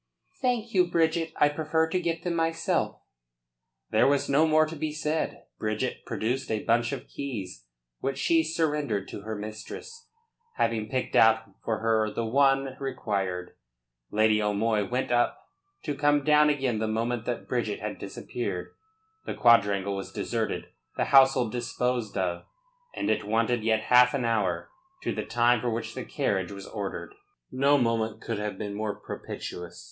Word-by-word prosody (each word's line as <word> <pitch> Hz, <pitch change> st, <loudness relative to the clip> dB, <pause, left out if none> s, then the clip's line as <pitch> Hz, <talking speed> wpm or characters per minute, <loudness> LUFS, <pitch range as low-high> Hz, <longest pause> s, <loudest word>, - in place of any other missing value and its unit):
"Thank 240 Hz, -3 st, 0 dB
you, 180 Hz, -2 st, +4 dB
Bridget. 165 Hz, -1 st, +1 dB
I 150 Hz, -, +5 dB
prefer 160 Hz, +2 st, 0 dB
to 185 Hz, -, +1 dB
get 165 Hz, -1 st, -2 dB
them, 175 Hz, -, -1 dB
myself." 165 Hz, 0 st, 0 dB, 0.9 s
There -, -, +4 dB
was 140 Hz, 0 st, +2 dB
no 150 Hz, +4 st, +4 dB
more 155 Hz, 0 st, +5 dB
to 155 Hz, +1 st, -7 dB
be 155 Hz, 0 st, -2 dB
said. 155 Hz, +1 st, -2 dB, 0.2 s
Bridget 110 Hz, 0 st, -2 dB
produced 125 Hz, +4 st, -2 dB
a 110 Hz, -1 st, -1 dB
bunch 120 Hz, +1 st, +2 dB
of -, -, -5 dB
keys, 100 Hz, -, -6 dB, 0.3 s
which 135 Hz, 0 st, -2 dB
she 165 Hz, +3 st, +3 dB
surrendered 150 Hz, -, -1 dB
to -, -, -7 dB
her 110 Hz, +2 st, -5 dB
mistress, 110 Hz, -, -8 dB, 0.5 s
having 110 Hz, -2 st, 0 dB
picked 130 Hz, -1 st, -2 dB
out 110 Hz, -2 st, +5 dB
for 110 Hz, -2 st, -1 dB
her 110 Hz, -1 st, +2 dB
the 115 Hz, -, -2 dB
one 135 Hz, +2 st, +3 dB
required. 95 Hz, -9 st, -2 dB, 0.6 s
Lady 110 Hz, 0 st, +3 dB
O'Moy 105 Hz, 0 st, +1 dB
went 125 Hz, 0 st, -1 dB
up, 120 Hz, 0 st, +1 dB, 0.4 s
to 145 Hz, -, -2 dB
come 145 Hz, 0 st, +2 dB
down 150 Hz, +1 st, +5 dB
again 135 Hz, -6 st, 0 dB
the 110 Hz, -, 0 dB
moment 115 Hz, +1 st, -1 dB
that 120 Hz, -, -3 dB
Bridget 115 Hz, -5 st, -1 dB
had 105 Hz, 0 st, -5 dB
disappeared. 100 Hz, -1 st, -5 dB, 0.5 s
The -, -, -3 dB
quadrangle 100 Hz, -4 st, +4 dB
was 95 Hz, -, -6 dB
deserted, -, -, -2 dB, 0.3 s
the -, -, +1 dB
household 130 Hz, -4 st, +6 dB
disposed 120 Hz, -2 st, -2 dB
of, 90 Hz, -2 st, -1 dB, 0.5 s
and 305 Hz, -, -2 dB
it -, -, 0 dB
wanted 115 Hz, +1 st, +1 dB
yet 110 Hz, -1 st, +2 dB
half 125 Hz, +1 st, +6 dB
an 125 Hz, -3 st, -1 dB
hour 100 Hz, -7 st, 0 dB, 0.3 s
to -, -, -1 dB
the -, -, -3 dB
time 120 Hz, -1 st, +3 dB
for 125 Hz, -, 0 dB
which 115 Hz, 0 st, -3 dB
the -, -, -5 dB
carriage 95 Hz, -2 st, -1 dB
was 100 Hz, -1 st, -8 dB
ordered. 105 Hz, -, -5 dB, 0.4 s
No 140 Hz, +3 st, +4 dB
moment 115 Hz, -3 st, 0 dB
could 115 Hz, -2 st, -4 dB
have 105 Hz, -2 st, -3 dB
been 105 Hz, -1 st, -4 dB
more 105 Hz, 0 st, -2 dB
propitious. 90 Hz, -2 st, -7 dB
120 Hz, 160 wpm, -27 LUFS, 105-145 Hz, 0.9 s, household